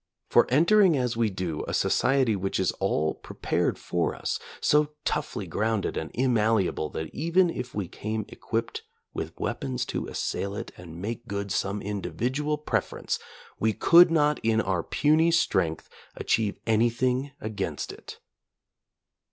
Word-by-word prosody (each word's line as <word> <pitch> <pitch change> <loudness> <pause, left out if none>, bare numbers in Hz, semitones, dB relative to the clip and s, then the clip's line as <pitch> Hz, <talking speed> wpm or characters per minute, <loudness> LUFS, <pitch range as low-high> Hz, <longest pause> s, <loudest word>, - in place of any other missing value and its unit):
For - - +5
entering 170 - +5
as 125 -2 0
we 115 -1 +2
do 90 -5 -3
a - - -1
society 130 -5 +2
which 95 0 -2
is 95 - +2
all 80 +1 +1
prepared - - -2
for 85 -1 -1
us, - - -2 0.2
so 150 0 +3
toughly 150 -9 -2
grounded 110 +4 -1
and 80 - -3
immalleable 110 -10 +1
that 80 -1 -5
even 170 +4 +2
if 125 -5 -6
we 100 -4 -2
came 110 +4 -4
equipped 115 +1 -3 0.3
with - - -5
weapons 65 -2 -2
to - - -3
assail 100 0 -3
it - - -6
and 85 -2 -10
make 115 +5 -5
good 100 0 -3
some 100 +2 -1
individual 130 +9 -2
preference, 150 - -2 0.4
we 110 0 +2
could 175 - +7
not 150 -2 +2
in 110 0 +2
our 95 -5 0
puny 155 - +3
strength 85 - +1 0.3
achieve 110 -3 0
anything 125 +4 +1
against 100 -8 -4
it. - - -11
110 Hz, 145 wpm, -27 LUFS, 95-140 Hz, 0.4 s, could